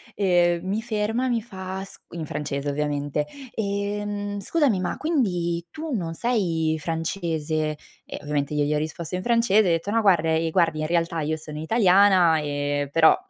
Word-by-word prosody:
ehm, 175 -3 +2
mi 205 +3 -1
ferma 225 +2 -1
e - - 0
mi 235 -2 +1
fa 190 -3 -6
s 195 - -11
in 165 -2 -5
francese, 145 -1 -3
ovviamente: 145 0 -1 0.3
"Ehm, 205 0 -2
scusami 255 - +1
ma 185 - -2
quindi 180 - 0
tu 315 0 -6
non 170 -7 -2
sei 165 -7 0
francese?" 160 -2 -2 0.3
E - - -7
ovviamente 145 0 -2
io 150 0 +2
gli 150 +1 0
ho - - +2
risposto 160 +3 -4
in 185 - -3
francese, 230 -3 +4
e 185 - +1
ho - - +3
detto: 180 +5 -5
"No, 230 +1 +2
guarda 175 -6 +3
ehm, 160 0 +1
guardi 165 -3 +2
in 155 - -1
realtà 170 0 0
io 155 +1 -1
sono 150 -1 -8
italiana, 185 -2 +5
ehm, 145 -1 -2
però, 160 +2 +6
175 Hz, 180 wpm, -24 LUFS, 155-205 Hz, 0.3 s, però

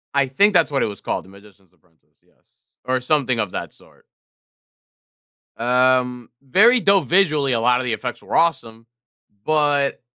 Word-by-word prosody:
I 140 -1 +2
think 205 +10 +2
that's 180 - +2
what 140 - -1
it - - +1
was 100 -2 -8
called, - - -4
"The - - -18
Magician's 100 -2 -20
Apprentice." 80 -1 -38
Yes, - - -35 0.5
or 130 0 -1
something 130 -2 0
of 105 -5 -2
that - - -7
sort. - - -22 1.5
Um, 125 0 0
very 215 - +4
dope 195 -6 +2
visually, 155 -8 +1
a 115 - 0
lot 125 +2 +2
of 130 - -4
the 120 - -2
effects 125 +2 -6
were - - -6
awesome, 115 -9 -1 0.6
but 145 -2 0
130 Hz, 165 wpm, -20 LUFS, 115-150 Hz, 1.5 s, very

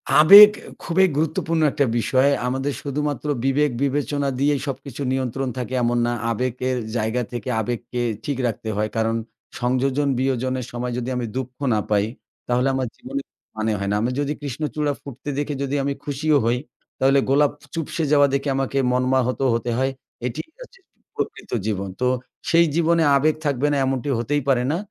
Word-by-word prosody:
আবেগ 200 +7 +11 0.3
খুবই 185 +2 +3
গুরুত্বপূর্ণ 160 +1 0
একটা 140 - +1
বিষয়। 130 +4 +3 0.2
আমাদের 135 +3 -1
শুধুমাত্র 145 0 -3 0.2
বিবেক-বিবেচনা 140 +1 0
দিয়েই 145 0 +2
সবকিছু 135 -1 -6
নিয়ন্ত্রণ 130 0 -1
থাকে 125 0 -4
এমন 120 +1 +1
না। 120 - 0 0.2
আবেগের 125 +2 -1 0.2
জায়গা 110 +3 0
থেকে 120 -1 -5
আবেগকে 120 +2 -3 0.2
ঠিক 140 -3 -2
রাখতে 110 -1 -4
হয়। 105 +1 0
কারণ 115 0 +1 0.4
সংযোজন 130 +3 +1
বিয়োজনের 130 -1 -1
সময় 125 +1 -3
যদি 125 0 -3
আমি 125 -1 -2
দুঃখ 130 -1 -3 0.2
না 110 - +2
পাই, 105 -1 +2 0.4
তাহলে 125 +2 +1
আমার 130 -1 -1
জীবনে 135 +2 -5 0.4
মানে 110 +1 0
হয় 100 0 -2
না। - - +1
আমি 120 +3 0
যদি 145 0 -1
কৃষ্ণচূড়া 145 +1 -2
ফুটতে 140 +1 -8
দেখে 145 +1 -2
যদি 140 +1 -2
আমি 140 0 0
খুশিও 145 +1 +1
হই, 120 +2 +2 0.4
তাহলে 135 +1 +4
গোলাপ 145 +1 +4 0.2
চুপসে 165 0 -3
যাওয়া 145 -1 +6
দেখে 140 +1 0
আমাকে 135 0 -1
মর্মাহত 125 0 +1
হতে 115 +1 -1
হয়। 130 +1 +1 0.4
এটি 120 - -5 0.2
কাছে - - -13 0.4
প্রকৃত - - -5 0.2
জীবন। 100 -2 -2
তো - - +2 0.4
সেই 170 0 +5
জীবনে 170 0 +3
আবেগ 155 +3 +2
থাকবে 140 0 +1
না 145 - +1
এমনটি 135 +1 -1
হতেই 145 +5 0
পারে 125 -2 +3
না। 165 - 0
135 Hz, 165 wpm, -22 LUFS, 125-145 Hz, 0.4 s, আবেগ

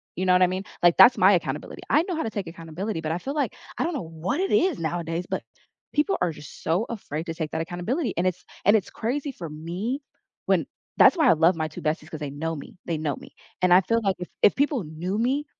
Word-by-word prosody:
You 185 - -1
know 180 - +6
what 180 0 +5
I - - +6
mean? 185 +1 -3 0.2
Like, 175 -1 +6
that's 245 - +9
my 190 +2 +6
accountability. 150 -6 -2
I 305 +3 +4
know 365 -1 -3
how 320 - -1
to - - -2
take 205 -3 -4
accountability, 165 +3 -5
but 155 -1 -2
I 165 - 0
feel 270 +10 -4
like 295 -1 -1 0.2
I - - +2
don't 340 -1 -1
know 275 - -3
what 165 - -3
it 390 - 0
is 370 -6 +3
nowadays, 165 +1 -2
but - - -1 0.5
people 305 +7 +1
are 180 - +2
just 150 -1 -12
so 175 +7 +1
afraid 165 -8 -5
to 165 - -4
take 160 -2 -3
that 160 - -1
accountability, 180 - -2
and 175 +2 +2
it's 180 -1 -3 0.2
and 205 +3 +6
it's 200 - -5
crazy 275 +5 -2
for 175 -10 -7
me 175 - -4 0.5
when - - +2 0.3
that's - - +7
why 320 - +4
I - - +8
love 165 +3 +4
my 160 -1 -1
2 150 - -9
besties, 155 0 -2
'cause 155 - -6
they 145 -2 -4
know 160 +4 -3
me. 145 - -10
They 165 - -1
know 150 -2 -1
me. - - -14 0.3
And 180 -1 +6
I 185 - +8
feel 230 +5 +1
like 195 -2 +1
if 180 - -6
if - - +6
people 280 -5 +1
knew 170 +5 -4
me, 265 +6 +1
180 Hz, 260 wpm, -25 LUFS, 160-235 Hz, 0.5 s, that's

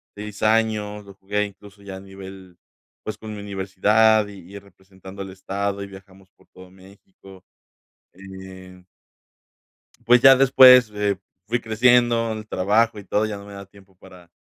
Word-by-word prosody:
6 105 0 -9
años, 110 -2 0
lo 100 - -14
jugué 105 +1 -3
incluso 100 0 -15
ya 95 -1 -9
a - - -10
nivel, 95 -2 -13 0.5
pues, 105 -1 -6
con 110 -1 -9
mi 105 - -8
universidad 105 +2 +1
y 95 -2 -14
y 100 - -8
representando 95 0 -15
al 95 - -7
estado, 100 +1 -4
y 100 - -8
viajamos 95 -1 -16
por - - -29
todo 95 0 -16
México. 95 0 -18 0.7
Eh 95 -1 -13 1.2
Pues, 125 0 +5
ya 135 0 +7
después, 125 -3 +6
eh, 105 -1 -1 0.3
fui 120 +2 -2
creciendo 115 +1 +2
en 110 - -6
el 110 0 -12
trabajo 105 +4 0
y 100 - -10
todo, 105 +2 -1
ya 105 - -6
no 100 0 -12
me 100 - -12
da 100 0 -10
tiempo 100 0 -22
para 90 -2 -18
100 Hz, 165 wpm, -21 LUFS, 95-110 Hz, 1.2 s, ya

